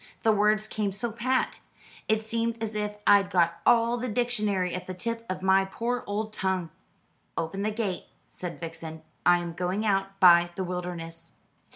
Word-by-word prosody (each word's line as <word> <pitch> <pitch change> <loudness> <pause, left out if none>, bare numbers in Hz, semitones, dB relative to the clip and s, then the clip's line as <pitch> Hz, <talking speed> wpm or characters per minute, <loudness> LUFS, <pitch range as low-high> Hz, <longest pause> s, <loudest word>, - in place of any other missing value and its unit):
The 225 - +5
words 210 +1 +2
came 210 -2 -1
so 220 +5 -3
pat. 255 +4 0 0.5
It 220 0 +1
seemed 230 +1 -1
as 220 0 -3
if 210 0 -3
I'd 200 -2 +6
got 170 -2 +2
all 235 0 +4
the 245 +1 -3
dictionary 210 -6 0
at 180 - -5
the 185 - -5
tip 230 +5 -3
of 185 0 -4
my 190 0 +5
poor 235 +6 -2
old 215 +1 -3
tongue." 190 -4 -1 0.7
"Open 165 +4 -2
the 210 - +1
gate," 210 -4 -3 0.2
said 175 -2 -7
Vixen. 165 -1 -7 0.2
"I 175 0 +7
am 175 -1 -4
going 180 +5 -1
out 195 -1 0
by 175 -2 +7
the 190 - -2
wilderness." 175 -2 -5
195 Hz, 175 wpm, -27 LUFS, 180-220 Hz, 0.7 s, I